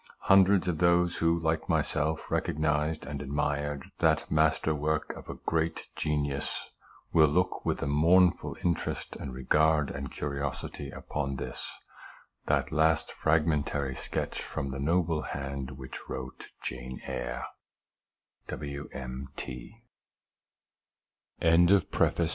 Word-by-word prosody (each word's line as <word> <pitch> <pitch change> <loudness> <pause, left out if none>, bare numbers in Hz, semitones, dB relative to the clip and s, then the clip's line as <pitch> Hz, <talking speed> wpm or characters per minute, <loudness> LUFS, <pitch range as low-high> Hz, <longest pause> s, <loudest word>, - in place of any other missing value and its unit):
Hundreds 95 -1 +5
of 85 -4 0
those 85 0 +3
who, 85 0 +2
like 80 0 0
myself, 75 +2 0
recognized 75 +1 0
and 70 -2 -5
admired 75 0 -1 0.2
that - - +2
master 80 0 +3
work 75 +1 -1
of - - -11
a - - -4
great 80 0 -1
genius, 70 -2 -2 0.4
will 80 -2 +7
look 90 +5 +1
with - - 0
a - - 0
mournful 85 +5 +4
interest 85 -1 -1
and 65 - -6
regard 75 +4 +2
and 70 -1 -5
curiosity 70 -1 -4
upon 70 -2 -3
this, 65 -1 -6 0.7
the - - +3
last 80 0 +2
fragmentary 75 -3 +1
sketch 70 - -3
from 70 - -4
the 70 - -4
noble 80 +1 +1
hand 70 -2 -5
which 65 -1 -9
wrote 65 0 -6 0.2
Ja 60 0 -5
75 Hz, 105 wpm, -29 LUFS, 70-80 Hz, 0.7 s, will